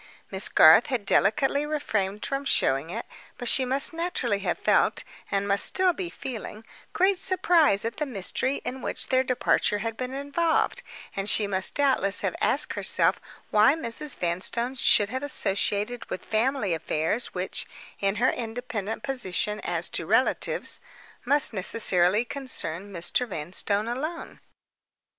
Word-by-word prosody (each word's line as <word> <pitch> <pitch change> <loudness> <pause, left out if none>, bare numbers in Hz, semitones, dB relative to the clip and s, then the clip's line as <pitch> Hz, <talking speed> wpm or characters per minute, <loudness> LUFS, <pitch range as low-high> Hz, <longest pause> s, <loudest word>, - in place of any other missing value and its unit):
Miss - - -3
Garth - - +7
had 250 -7 -2
delicately 270 +10 +2
refrained 215 -10 -2
from 275 0 -3
showing 140 - +1
it, 225 +6 -5 0.3
but 245 - -5
she 260 - +3
must 270 +5 +1
naturally 325 - -2
have 200 - -2
felt, - - +1 0.3
and 200 0 -1
must 200 0 +2
still 370 -1 +3
be 360 0 -5
feeling, 225 -6 -8 0.3
great 380 0 +2
surprise 335 - +3
at 230 - -4
the 300 - -2
mystery 260 +4 -2
in 260 +1 -5
which - - -3
their 260 0 +3
departure 250 -4 +1
had 225 +2 -4
been 255 +1 -5
involved; 285 +4 0 0.3
and 195 +1 -2
she 210 - +2
must 190 -2 +1
doubtless 260 -9 +3
have - - -2
asked - - +3
herself - - +3 0.3
why 215 +7 +5
Mrs. 275 0 -2
Vanstone 190 +9 -2
should 205 -4 +4
have 260 +3 -3
been 285 - -4
associated 210 0 -2
with - - -6
family 220 -3 0
affairs 160 +8 -2
which 180 +1 -2 0.3
(in 195 0 0
her 245 +4 +2
independent 225 -2 -5
position 210 -5 -2
as - - -2
to - - -3
relatives) - - 0 0.5
must 285 0 +3
necessarily 190 0 +3
concern 205 - -5
Mr. 180 +7 -1
Vanstone 200 +4 -2
alone. 300 +8 -5
230 Hz, 150 wpm, -26 LUFS, 200-275 Hz, 0.5 s, Garth